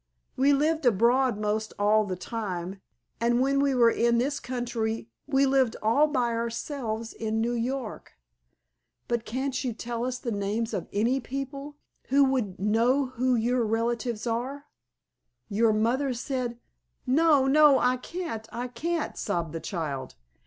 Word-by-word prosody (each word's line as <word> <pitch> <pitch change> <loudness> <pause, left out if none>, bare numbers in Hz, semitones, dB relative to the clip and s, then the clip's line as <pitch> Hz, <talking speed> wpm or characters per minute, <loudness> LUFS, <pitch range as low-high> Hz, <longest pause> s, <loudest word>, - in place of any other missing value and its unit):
We 275 +2 +4
lived 310 +3 +2
abroad 240 +2 +3
'most 215 +1 -2
all 210 +1 +3
the 185 -2 -3
time, 190 -2 -5 0.4
and 235 +1 +2
when 275 +2 +2
we 280 -1 +2
were 235 -2 +5
in 235 0 +2
this 280 +4 0
country 235 -2 -3 0.2
we 275 -1 +3
lived 265 -4 +2
all 275 +8 +4
by 250 -5 0
ourselves 230 -1 -3
in 220 0 -2
New 235 +2 0
York." 240 0 -4 0.9
"But 235 -1 -1
can't 265 +3 -2
you 250 -3 -2
tell 235 +1 -4
us 250 0 -2
the 245 -2 -4
names 210 +3 -2
of - - -3
any 235 +6 +1
people 275 +3 -6 0.3
who 280 +2 +4
would 250 -9 0
know 230 +7 +2
who 255 0 +1
your 240 +2 +1
relatives 230 +1 -1
are? 255 +5 -3 0.8
Your 220 +2 +3
mother 245 +5 +1
said——" 250 -1 -3 0.5
"No, 290 +1 +4
no, 290 0 +6
I 250 0 +2
can't, 250 -6 -6
I 245 +1 -4
can't!" 320 +7 -2
sobbed 170 -6 -2
the 165 - -3
child. 145 -8 -4
240 Hz, 150 wpm, -27 LUFS, 220-270 Hz, 0.9 s, no